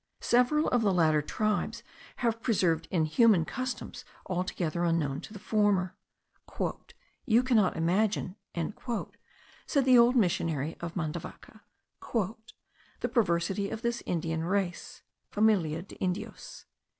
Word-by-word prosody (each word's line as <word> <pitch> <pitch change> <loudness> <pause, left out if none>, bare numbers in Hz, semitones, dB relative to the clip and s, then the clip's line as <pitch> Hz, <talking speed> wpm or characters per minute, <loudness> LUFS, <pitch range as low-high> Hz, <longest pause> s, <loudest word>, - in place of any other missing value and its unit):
Several 250 +6 +3
of 245 - +2
the 205 -3 +3
latter 160 -4 +3
tribes 215 +7 -1 0.3
have 230 -2 -1
preserved 175 -9 +1
inhuman 175 +2 +3
customs 255 +5 -5 0.2
altogether 180 -2 -2
unknown 160 -5 0
to - - -11
the 210 - -8
former. 200 -3 +1 1.3
"You 235 +2 +4
cannot 220 -10 +2
imagine," 185 +3 +1 1.3
said 280 -3 +2
the 255 -2 +7
old 240 +2 +5
missionary 165 - +1
of 170 -1 -6
Mandavaca, 165 -1 -6 0.5
"the 220 +1 -5
perversity 195 -3 +1
of 220 - -6
this 235 0 -1
Indian 160 -1 -1
race 185 0 -2 0.3
(familia 185 -7 +2
de 195 - -14
Indios). 185 0 -5
190 Hz, 115 wpm, -29 LUFS, 170-225 Hz, 1.3 s, the